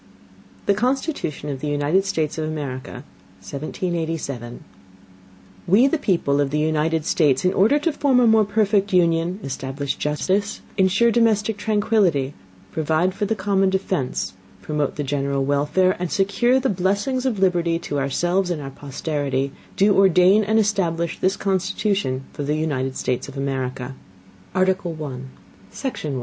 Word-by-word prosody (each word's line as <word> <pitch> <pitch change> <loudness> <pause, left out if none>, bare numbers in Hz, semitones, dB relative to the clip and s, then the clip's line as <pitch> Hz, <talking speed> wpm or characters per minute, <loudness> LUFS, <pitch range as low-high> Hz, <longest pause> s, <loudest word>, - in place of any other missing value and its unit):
THE 200 - +4
CONSTITUTION 245 - -2
OF 135 - -5
THE 150 - -4
UNITED 145 +6 +1
STATES 160 -5 -1
OF 155 - -1
AMERICA, 135 -5 -5 0.4
1787 155 - -4 1.0
We 205 +8 +5
the 300 +3 +1
people 145 - +1
of 140 - 0
the 150 - -1
United 155 +1 0
States, 150 -3 +2
in 185 - +3
Order 215 +10 +4
to 325 +3 0
form 270 -4 +3
a 245 - +5
more 220 -1 +5
perfect 205 -1 +1
Union, 170 +1 +2
establish 135 +1 -4
Justice, 190 +7 -1
insure 195 +5 +3
domestic 220 -2 +2
Tranquility, 205 -10 +1 0.4
provide 160 +4 +1
for 205 - -2
the 220 +2 0
common 195 -1 +1
defence, 190 -7 -2 0.3
promote 150 +1 -1
the 145 - -2
general 140 -1 -1
Welfare, 150 +7 +2
and 180 -2 -3
secure 240 +6 +2
the 265 - 0
Blessings 205 +7 0
of 235 -5 -1
Liberty 175 -3 +2
to 145 -4 -3
ourselves 175 +7 0
and 170 -3 -2
our 135 -1 -6
Posterity, 140 -1 -3 0.3
do 200 0 +4
ordain 190 +2 +5
and 220 +2 +1
establish 175 -6 0
this 190 +1 +1
Constitution 190 -7 -1
for - - -6
the 145 +1 0
United 135 -4 -2
States 125 - -2
of 140 0 -9
America. 130 -1 -3 0.6
Article 185 -2 +1
1 135 -4 -7 0.4
Section 200 - -4
1. 130 - -2
170 Hz, 150 wpm, -22 LUFS, 145-200 Hz, 1.0 s, We